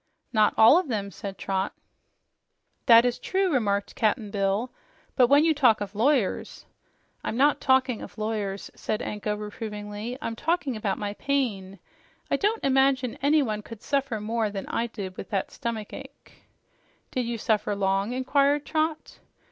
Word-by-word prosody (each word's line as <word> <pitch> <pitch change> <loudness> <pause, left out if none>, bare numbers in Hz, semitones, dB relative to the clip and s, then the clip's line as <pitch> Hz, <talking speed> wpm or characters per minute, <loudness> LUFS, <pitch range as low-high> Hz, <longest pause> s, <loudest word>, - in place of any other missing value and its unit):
"Not 215 -2 +3
all 230 +10 +8
of 370 - -4
them," 205 -5 -3
said 195 -2 -7
Trot. 195 0 -2 1.1
"That 230 -1 +8
is 245 -1 0
true," 380 -3 0
remarked 200 -5 0
Cap'n 215 -1 0
Bill. 200 +4 0 0.4
"But 250 - +5
when 285 +4 +5
you 325 - +4
talk 250 -7 +4
of 205 0 -5
lawyers 230 -1 0 0.3
" - - -41
"I'm 225 - -3
not 285 +3 +3
talking 260 -3 +2
of - - -10
lawyers," 210 -2 -3
said 215 - -3
Anko 210 0 -3
reprovingly. 210 +2 -6
"I'm 230 -6 -4
talking 300 -1 -1
about 210 -3 -2
my 205 -1 -3
pain. 210 -8 -2 0.5
I - - +4
don't 425 +3 0
imagine 265 -2 +2
anyone 275 -7 +2
could 225 0 -11
suffer 275 -5 -1
more 220 +1 -1
than 200 -1 -5
I 235 - -1
did 195 -5 -7
with - - -7
that 195 -2 -2
stomach 225 -3 -5
ache." - - -12 0.7
"Did 250 -2 -1
you 235 0 -2
suffer 210 -1 0
long?" 195 +2 0
inquired 280 +3 +2
Trot. 315 0 -2
225 Hz, 160 wpm, -26 LUFS, 205-270 Hz, 1.1 s, all